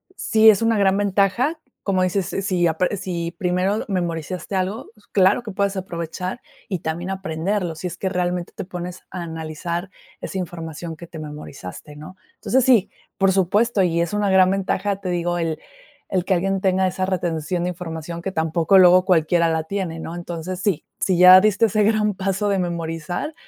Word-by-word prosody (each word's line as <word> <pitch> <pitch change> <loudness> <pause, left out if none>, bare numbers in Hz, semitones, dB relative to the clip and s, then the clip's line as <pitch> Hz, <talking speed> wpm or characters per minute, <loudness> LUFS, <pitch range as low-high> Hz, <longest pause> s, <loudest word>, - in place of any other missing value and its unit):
sí 220 - +5
es 205 +1 -1
una 225 -1 +2
gran 195 -1 +3
ventaja, 205 - +1 0.2
como 190 -2 +1
dices, 185 +1 +1 0.2
si 180 -2 +1
apre 180 +4 0
si 170 -2 -3
primero 185 +2 0
memorizaste 180 0 -3
algo, 190 +5 -2 0.2
claro 195 +4 +3
que 215 - -6
puedes 200 0 -1
aprovechar 180 +2 -5 0.3
y 185 -6 -3
también 170 +4 -4
aprenderlo, 185 0 -2
si 160 - -8
es 175 - -3
que 190 - -2
realmente 180 -1 -2
te 200 - -5
pones 180 0 -7
a 185 - -5
analizar 170 +2 -5 0.3
esa 190 - -5
información 165 -1 -6
que 170 +2 -10
te 165 -1 -10
memorizaste, 150 -4 -9
¿no? 155 +5 -11 0.2
Entonces, 260 +1 +1
sí, 240 -7 +4 0.3
por 195 -1 +4
supuesto, 200 +3 +2
y 170 -2 +1
es 170 +3 -2
una 205 -2 +1
gran 185 -1 +5
ventaja, 195 +1 -1
te 185 - -4
digo, 175 0 -1
el 165 -2 -2 0.5
el 185 -2 0
que 190 - +2
alguien 195 +2 0
tenga 190 0 +2
esa 185 0 -1
retención 175 -2 -1
de 180 - 0
información 170 -1 -6
que 190 +2 -3
tampoco 160 +2 +2
luego 185 0 +7
cualquiera 170 -1 +3
la 160 -1 0
tiene, 170 -2 -4
¿no? 165 - -6
Entonces, 175 +1 -5
sí, 190 -6 0
si 185 -3 +1
ya 185 +1 +9
diste 215 +1 +3
ese 215 0 +1
gran 210 0 +2
paso 195 +1 -1
de 195 -1 +1
memorizar, 170 - -3
185 Hz, 180 wpm, -22 LUFS, 170-195 Hz, 0.5 s, ya